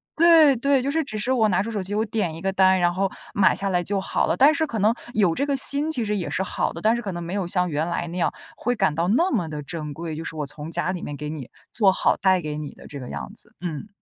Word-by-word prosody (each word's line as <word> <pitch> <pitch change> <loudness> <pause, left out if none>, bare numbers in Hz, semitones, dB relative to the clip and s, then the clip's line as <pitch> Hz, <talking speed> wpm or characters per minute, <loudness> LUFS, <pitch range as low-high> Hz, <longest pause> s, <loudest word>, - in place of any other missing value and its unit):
对 325 -4 +6
对， 275 +2 +2
就 275 +2 -1
是 320 +1 0
只 215 - -6
是 215 +5 -2
我 235 -4 +3
拿 190 0 +1
出 230 - -5
手 210 - -2
机， 195 +2 -4
我 215 - +1
点 205 -7 -2
一 165 - -9
个 195 - 0
单， 190 -1 +4
然 175 0 +2
后 195 +2 0 0.2
买 195 -2 +4
下 195 - -2
来 180 -2 +1
就 200 +3 -1
好 - - 0
了。 - - +1
但 285 +4 +6
是 315 +2 0
可 230 - -4
能 215 +3 +3 0.2
有 195 -6 +3
这 280 - -1
个 285 -1 0
心， 285 +3 +6
其 245 -7 -2
实 210 0 -1
也 180 - -3
是 190 - -1
好 - - -2
的， 170 - -8
但 220 +4 +3
是 240 - -3
可 205 -4 -4
能 175 0 -5
没 170 +2 -6
有 195 -3 -2
像 180 0 0
原 155 +2 -1
来 175 0 -2
那 175 +2 -6
样， 175 - +1 0.3
会 245 +2 -1
感 195 -8 +1
到 165 +3 -1
那 330 - +2
么 185 -10 0
得 150 -1 -6
珍 150 0 -6
贵， 160 0 -6
就 160 - -6
是 - - -6
我 150 -2 -3
从 150 +2 -8
家 175 +2 -1
里 180 -2 -5
面 145 - -6
给 150 0 -5
你 150 -5 -7 0.2
做 205 -4 +4
好 - - +1
带 190 -2 +2
给 150 -2 -5
你 150 -1 -6
的 - - -15
这 145 - -8
个 125 - -8
样 - - -6
子。 220 +1 -2
嗯。 175 +2 -5
190 Hz, 330 characters per minute, -23 LUFS, 170-225 Hz, 0.3 s, 对